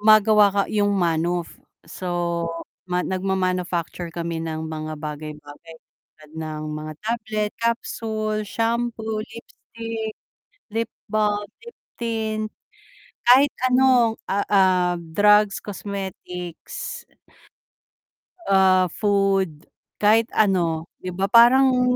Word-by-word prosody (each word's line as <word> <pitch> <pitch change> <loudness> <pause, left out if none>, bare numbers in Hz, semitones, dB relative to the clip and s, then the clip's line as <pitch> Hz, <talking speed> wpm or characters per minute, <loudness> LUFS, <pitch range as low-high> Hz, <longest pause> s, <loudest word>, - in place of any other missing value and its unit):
gumagawa 215 -1 +6
ka 200 0 0
yung 205 -1 +2
manuf. 170 -1 0 0.3
So, 170 0 -2 0.4
ma 180 0 0
nagma-manufacture 185 -2 -2
kami 170 0 -4
ng 160 -1 -4
mga 155 0 -5
bagay-bagay 150 +1 -8
tulad 150 +1 -23
ng 155 -1 -5
mga 155 0 -5
tablet, 215 -2 -2
capsule, 220 -2 -1
shampoo, 225 0 -2
lipstick, 225 0 -7 0.6
lip 230 0 -1 0.2
balm, 210 -1 0 0.2
lip 470 0 -12 0.2
tint, 220 -2 -2 0.8
kahit 270 +3 +7 0.2
ano, 250 -3 +4
ah, 200 +1 -1
ah, 185 -3 +3
drugs, 205 +5 +3
cosmetics 195 - -6 1.5
ah, 190 -1 +5
food 195 -6 0 0.3
kahit 220 +2 +4
ano. 170 -6 +2
'Di 185 - -5
ba 190 +2 0
parang 250 +1 +6
200 Hz, 95 wpm, -23 LUFS, 170-220 Hz, 1.5 s, kahit